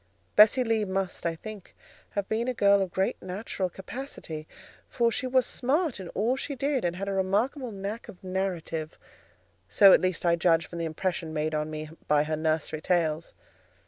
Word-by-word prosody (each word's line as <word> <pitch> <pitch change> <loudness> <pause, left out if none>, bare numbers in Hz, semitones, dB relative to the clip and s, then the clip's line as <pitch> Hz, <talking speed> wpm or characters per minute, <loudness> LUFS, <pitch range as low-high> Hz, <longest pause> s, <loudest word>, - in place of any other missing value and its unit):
Bessie 215 +5 +7
Lee 225 -2 +1
must, 190 -3 -2
I 165 - -1
think, 210 +2 -10 0.4
have 200 -1 0
been 225 +2 -1
a 255 - -1
girl 200 -2 +5
of 190 -2 -2
good 190 +2 +1
natural 185 0 -3
capacity, 185 - -7 0.4
for 235 -1 +2
she 255 - -2
was 255 0 +3
smart 280 - 0
in 185 -2 -7
all 230 +6 +2
she 280 +1 -4
did, 275 -1 0
and 175 0 0
had 195 +2 -4
a 200 - -1
remarkable 220 +8 0
knack 200 +3 -5
of 180 - -12
narrative; 180 -4 -3 0.7
so, 195 -2 +8
at - - +6
least, 185 -1 -1
I 170 0 +4
judge 165 0 +3
from 170 - -8
the 165 - -1
impression 165 0 -2
made 155 +1 -1
on 150 0 -1
me 155 0 -6 0.2
by 150 0 +4
her 155 +1 -1
nursery 155 0 -1
tales. 165 -2 0
190 Hz, 185 wpm, -28 LUFS, 165-225 Hz, 0.7 s, so